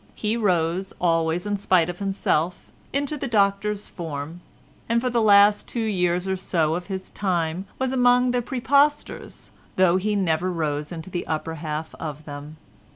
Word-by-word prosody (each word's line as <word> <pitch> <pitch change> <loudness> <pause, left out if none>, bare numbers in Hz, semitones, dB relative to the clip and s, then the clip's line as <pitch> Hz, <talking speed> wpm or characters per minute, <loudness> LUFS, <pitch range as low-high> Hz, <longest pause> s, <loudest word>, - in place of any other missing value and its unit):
He 215 +1 0
rose, 185 -3 0
always 165 0 +1
in 205 0 -1
spite 185 -4 +3
of 175 0 -6
himself, 180 -4 -1 0.2
into 285 +2 -1
the 275 - -3
Doctor's 205 -1 +1
form, 160 -1 -6 0.5
and 230 0 +3
for 250 +1 -1
the 235 -1 +2
last 205 -1 +5
two 240 - -4
years 180 -3 0
or 190 - 0
so 165 -4 0
of 175 +1 -4
his 190 -1 -6
time 180 -1 -1
was 260 0 -1
among 250 0 +4
the 245 0 +1
præpostors, 280 +4 0 0.2
though 185 -1 +4
he 210 +3 0
never 180 -2 +1
rose 150 -3 -2
into 170 +1 -7
the 175 - -4
upper 160 +1 -2
half 155 0 -5
of 150 -1 -6
them. 145 +1 -8
185 Hz, 165 wpm, -24 LUFS, 165-210 Hz, 0.5 s, last